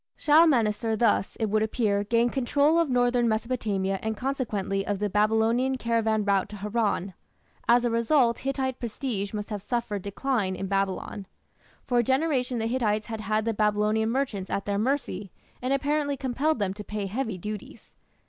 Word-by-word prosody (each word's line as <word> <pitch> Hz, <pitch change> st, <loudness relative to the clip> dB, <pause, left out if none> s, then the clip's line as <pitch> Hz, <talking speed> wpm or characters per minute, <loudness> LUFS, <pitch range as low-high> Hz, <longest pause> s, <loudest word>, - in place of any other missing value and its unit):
Shalmaneser 240 Hz, -9 st, +3 dB
thus, 215 Hz, -3 st, +1 dB
it 225 Hz, -, -1 dB
would 215 Hz, 0 st, +2 dB
appear, 215 Hz, -2 st, +1 dB
gained 235 Hz, +3 st, +1 dB
control 285 Hz, +5 st, +3 dB
of 335 Hz, -3 st, +1 dB
northern 245 Hz, -1 st, +2 dB
Mesopotamia 215 Hz, -4 st, -1 dB
and 220 Hz, -1 st, -3 dB
consequently 210 Hz, -7 st, -2 dB
of 205 Hz, 0 st, -2 dB
the 205 Hz, 0 st, -2 dB
Babylonian 225 Hz, +5 st, +2 dB
caravan 225 Hz, -3 st, 0 dB
route 200 Hz, -2 st, +1 dB
to 210 Hz, -, -8 dB
Haran. 205 Hz, -2 st, -1 dB, 0.6 s
As 240 Hz, +1 st, +5 dB
a 240 Hz, -, +1 dB
result 235 Hz, +1 st, +2 dB
Hittite 265 Hz, -1 st, -2 dB
prestige 220 Hz, -4 st, -3 dB
must 210 Hz, 0 st, -5 dB
have 205 Hz, -2 st, -3 dB
suffered 220 Hz, -2 st, -2 dB
decline 200 Hz, -1 st, -1 dB
in 195 Hz, -, -4 dB
Babylon. 195 Hz, 0 st, -2 dB, 0.6 s
For 245 Hz, -2 st, +2 dB
a -, -, +3 dB
generation 265 Hz, -1 st, +1 dB
the 225 Hz, -, -1 dB
Hittites 220 Hz, -3 st, 0 dB
had 220 Hz, -1 st, -4 dB
had 215 Hz, +1 st, 0 dB
the 230 Hz, -, 0 dB
Babylonian 210 Hz, +1 st, +1 dB
merchants 230 Hz, -7 st, -2 dB
at 200 Hz, -, -2 dB
their 200 Hz, 0 st, -1 dB
mercy, 210 Hz, -6 st, -2 dB, 0.3 s
and 255 Hz, +2 st, -2 dB
apparently 285 Hz, +1 st, 0 dB
compelled 270 Hz, +4 st, 0 dB
them 200 Hz, -3 st, -1 dB
to 210 Hz, +1 st, -8 dB
pay 210 Hz, -1 st, -4 dB
heavy 220 Hz, 0 st, -3 dB
duties. 210 Hz, +3 st, -8 dB
225 Hz, 165 wpm, -27 LUFS, 205-255 Hz, 0.6 s, As